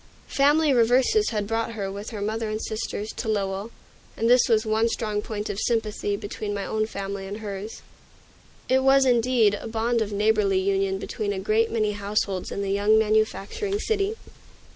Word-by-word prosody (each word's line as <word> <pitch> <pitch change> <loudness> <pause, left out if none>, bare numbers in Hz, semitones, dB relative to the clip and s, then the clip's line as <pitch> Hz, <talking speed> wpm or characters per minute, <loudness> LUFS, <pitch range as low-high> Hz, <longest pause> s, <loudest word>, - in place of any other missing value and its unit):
Family 290 +1 +4
reverses 255 - +3
had 210 -3 -2
brought 225 +2 -2
her, 200 -3 -4
with 200 +2 -6
her 210 -3 -5
mother 220 +1 -2
and 215 0 -2
sisters, 215 -1 -4
to 235 - -4
Lowell, 200 0 -1 0.5
and 230 - +1
this 245 +1 +5
was 220 -1 +3
one 220 +1 +2
strong 215 -2 -2
point 210 -1 -5
of 200 - -4
sympathy 215 -3 -1
between 205 0 -5
my 200 - -3
own 215 0 -1
family 195 -2 -5
and 200 +2 -5
hers. 210 0 -7 0.8
It 260 +1 +3
was, 270 0 +5
indeed, 240 -3 +3
a 205 - -5
bond 230 +1 0
of 215 -1 -2
neighborly 205 -1 +2
union 195 0 0
between 205 +1 -3
a 200 - -3
great 215 +3 +1
many 215 -2 0
households 200 -2 -2
in 200 - -3
the 195 - -2
young 205 +2 +3
manufacturing 220 - 0
city. 425 -1 0
215 Hz, 180 wpm, -25 LUFS, 205-230 Hz, 0.8 s, this